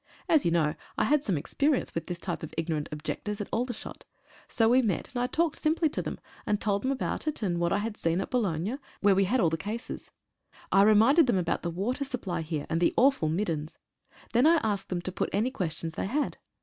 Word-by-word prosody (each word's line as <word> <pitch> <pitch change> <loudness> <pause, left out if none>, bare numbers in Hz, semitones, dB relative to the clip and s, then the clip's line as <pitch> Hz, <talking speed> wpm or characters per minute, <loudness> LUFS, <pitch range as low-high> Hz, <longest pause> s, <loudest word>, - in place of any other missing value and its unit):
As 315 -3 +4
you - - +4
know, 155 -3 +2 0.2
I - - +3
had 290 +5 +3
some 195 - 0
experience 280 - 0
with 165 -1 -4
this 175 - -3
type 175 -1 -4
of 160 - -8
ignorant 160 -3 -2
objectors 155 +7 -4
at 205 - -3
Aldershot. 245 0 -4 0.4
So 225 -2 +2
we 250 +3 +5
met, 200 - -1
and 245 - -1
I 245 - +1
talked 330 +3 0
simply 315 +1 +2
to - - -3
them, - - -5 0.2
and 210 -1 0
told 200 -2 0
them 260 - 0
about 275 +3 -2
it, 300 -7 -2
and 175 -4 0
what 170 0 +1
I - - +3
had 215 +1 -3
seen 165 -3 0
in 195 - -1
Boulogne, 210 - -1 0.2
where 200 -1 +5
we 195 +1 +3
had 255 +7 +1
all 170 -7 +3
the 160 - 0
cases. 215 +7 -6 0.6
I 195 - +6
reminded 225 +9 +6
them 235 - +3
about 175 -2 0
the 170 - -2
water 210 +11 -2
supply 240 -11 -3
here, 155 -2 -3
and 165 +1 -1
the 175 - +3
awful 265 - +4
"middens." 160 -3 -2 0.6
Then 245 +5 +5
I 335 - +6
asked 205 -3 -1
them 175 -1 -2
to 185 - -3
put - - -2
any 220 +6 +1
questions 165 - -3
they - - -3
had. 285 +7 -1
205 Hz, 230 wpm, -28 LUFS, 170-250 Hz, 0.6 s, I